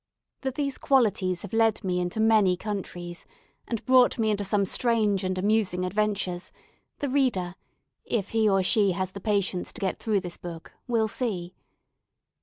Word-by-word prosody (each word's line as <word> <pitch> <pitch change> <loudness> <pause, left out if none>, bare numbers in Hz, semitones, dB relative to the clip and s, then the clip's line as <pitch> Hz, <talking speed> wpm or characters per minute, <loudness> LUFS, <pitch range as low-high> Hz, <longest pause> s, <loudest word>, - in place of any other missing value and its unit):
That 265 -1 -3
these 280 -2 -2
qualities 205 -9 +2
have 205 - -8
led 225 -1 +2
me 180 -2 0
into 180 +4 -2
many 215 -5 +4
countries, 180 -4 -6 0.4
and 230 -3 -4
brought 255 -1 +5
me 220 -2 +2
into 205 -1 -1
some 200 0 +1
strange 215 -2 +1
and 185 0 -1
amusing 190 -2 +1
adventures, 195 -2 -1 0.5
the 285 - -2
reader, 250 -10 +1 0.5
if 205 -4 -2
he 220 -1 +2
or 195 -1 +3
she 200 0 +3
has 185 +1 -2
the 200 - -9
patience 200 -3 -1
to - - -8
get 190 - -1
through 210 -3 0
this 175 -2 -6
book, 170 -2 -9 0.2
will 230 -3 +2
see. 195 -6 -3
205 Hz, 165 wpm, -27 LUFS, 185-225 Hz, 0.5 s, brought